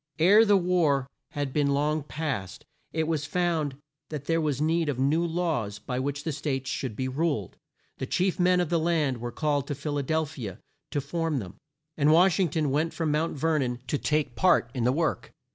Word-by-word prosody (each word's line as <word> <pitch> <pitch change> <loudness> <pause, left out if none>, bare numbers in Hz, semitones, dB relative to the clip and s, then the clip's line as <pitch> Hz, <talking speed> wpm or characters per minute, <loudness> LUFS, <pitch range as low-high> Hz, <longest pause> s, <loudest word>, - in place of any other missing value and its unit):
Ere 200 +7 +7
the 205 -2 +5
war 170 -7 +2 0.3
had 145 -2 -3
been 140 -2 +2
long 150 +2 +1
past, 135 - -4 0.3
it 160 -1 -1
was 155 -2 -1
found 165 -6 0 0.3
that 150 -3 -5
there 165 +1 +1
was 150 -4 -1
need 160 +1 +1
of 140 - -1
new 145 +6 +2
laws 160 -12 -1
by 125 +4 -4
which 140 +2 -3
the 160 - -2
States 140 -3 -3
should 125 -6 -3
be 130 +4 -2
ruled. 135 - -1 0.4
The - - -3
chief 185 0 0
men 180 0 +4
of 175 -3 0
the 170 - +2
land 160 -6 +1
were 120 +1 -4
called 145 -2 0
to 145 - -3
Phil 145 +1 -3
a - - -1
del 160 +3 +1
phi 140 -7 -7
a 95 - -8 0.3
to 145 - -1
form 165 +1 -2
them, 95 -6 -6 0.4
and 150 0 +4
Wash 180 +4 +5
ing 185 -3 +3
ton 150 -2 0
went 155 +4 0
from 160 -3 0
Mount 155 +1 0
Ver 160 +2 +1
non 125 -2 -1
to 145 - -1
take 150 -1 0
part 180 -10 +3
in 125 -4 -1
the 125 - +4
work. 160 +3 -1
150 Hz, 215 wpm, -27 LUFS, 135-165 Hz, 0.4 s, Ere